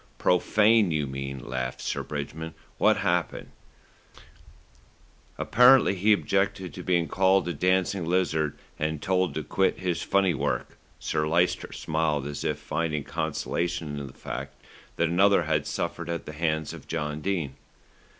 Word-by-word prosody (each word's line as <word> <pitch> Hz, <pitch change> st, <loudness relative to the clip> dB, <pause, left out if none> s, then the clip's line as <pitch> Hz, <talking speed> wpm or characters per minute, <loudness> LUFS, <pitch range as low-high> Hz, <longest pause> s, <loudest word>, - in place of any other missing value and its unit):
"Profane, 105 Hz, +3 st, +4 dB
you 75 Hz, -3 st, 0 dB
mean," 70 Hz, 0 st, -5 dB
laughed 65 Hz, 0 st, -3 dB
Sir -, -, -2 dB
Bridgman. 80 Hz, +2 st, -6 dB, 0.2 s
"What -, -, +4 dB
happened?" 85 Hz, 0 st, -1 dB, 1.9 s
"Apparently 125 Hz, -1 st, +6 dB
he 100 Hz, +3 st, +2 dB
objected 95 Hz, -2 st, +1 dB
to 90 Hz, -, -7 dB
being 85 Hz, -2 st, +1 dB
called 95 Hz, -1 st, +3 dB
a 85 Hz, -, -1 dB
dancing 90 Hz, +3 st, +1 dB
lizard, 80 Hz, -4 st, 0 dB, 0.2 s
and 75 Hz, 0 st, -1 dB
told 95 Hz, -1 st, 0 dB
to 80 Hz, -, -2 dB
quit 95 Hz, +6 st, +1 dB
his 90 Hz, -2 st, -2 dB
funny 95 Hz, -2 st, +2 dB
work." 60 Hz, -4 st, -2 dB, 0.2 s
Sir 75 Hz, 0 st, -1 dB
Lyster 85 Hz, +3 st, +1 dB
smiled 80 Hz, -3 st, -1 dB
as 70 Hz, 0 st, -5 dB
if -, -, -1 dB
finding 80 Hz, -3 st, -2 dB
consolation 80 Hz, 0 st, -2 dB
in 70 Hz, -, -6 dB
the -, -, -12 dB
fact 70 Hz, +1 st, -6 dB, 0.4 s
that 85 Hz, -, +1 dB
another 95 Hz, +4 st, +4 dB
had -, -, 0 dB
suffered 85 Hz, 0 st, -3 dB
at 85 Hz, 0 st, -3 dB
the 75 Hz, -, -7 dB
hands 80 Hz, -1 st, -1 dB
of -, -, -11 dB
John 75 Hz, -1 st, -3 dB
Dene. 85 Hz, -7 st, -2 dB
85 Hz, 145 wpm, -27 LUFS, 75-95 Hz, 1.9 s, Apparently